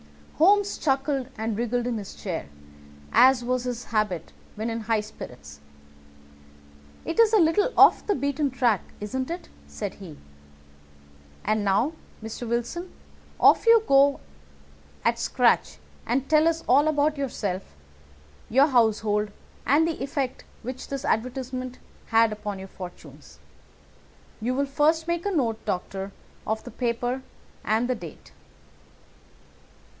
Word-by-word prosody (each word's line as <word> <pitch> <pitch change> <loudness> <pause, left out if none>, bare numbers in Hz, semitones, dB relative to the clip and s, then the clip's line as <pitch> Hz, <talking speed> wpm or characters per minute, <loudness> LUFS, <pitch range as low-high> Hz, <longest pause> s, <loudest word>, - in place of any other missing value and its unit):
Holmes 405 +4 +4
chuckled 270 -2 0
and 220 0 -2
wriggled 240 +2 -1
in 240 -3 -1
his 200 - -9
chair, 180 -5 -5 0.6
as 260 -1 +6
was 250 0 -1
his 245 -1 -3
habit 210 -7 -2 0.2
when 220 +2 -3
in 230 - -3
high 220 0 +1
spirits. 70 - -11 1.5
"It 330 - -3
is 455 -2 +6
a 445 - +5
little 390 +6 +3
off - - +6
the 410 - +2
beaten 280 +1 0
track, 240 -6 +1 0.2
isn't 255 +5 -3
it?" 345 +2 -6 0.2
said 205 -3 -5
he. 175 -7 -11 1.3
"And 215 0 +1
now, 205 +10 +2 0.3
Mr. 225 +1 -6
Wilson, 240 +10 -3 0.5
off - - +5
you 460 -1 +7
go 275 +1 +4 0.9
at - - +2
scratch 70 0 +2 0.3
and 260 +3 0
tell 310 0 +4
us 330 0 0
all 285 +5 +5
about 300 0 +2
yourself, 205 - -4 0.7
your 265 +5 +5
household, 215 -5 +2 0.4
and 295 +6 +4
the 330 - -3
effect 270 -1 -3 0.2
which 255 +2 -6
this 275 0 -4
advertisement 255 +2 -2 0.3
had 225 -1 +4
upon 210 -1 -5
your 190 0 -8
fortunes. 180 -2 -11 1.0
You 250 +3 -1
will 280 +1 +1
first 310 +4 +1
make 340 +2 -1
a - - 0
note, 235 - 0
Doctor, 190 +2 -3 0.4
of 220 0 -1
the - - -9
paper 245 +1 -2 0.4
and 220 +3 +1
the 255 - +1
date." 230 - -10
250 Hz, 135 wpm, -25 LUFS, 215-285 Hz, 1.5 s, you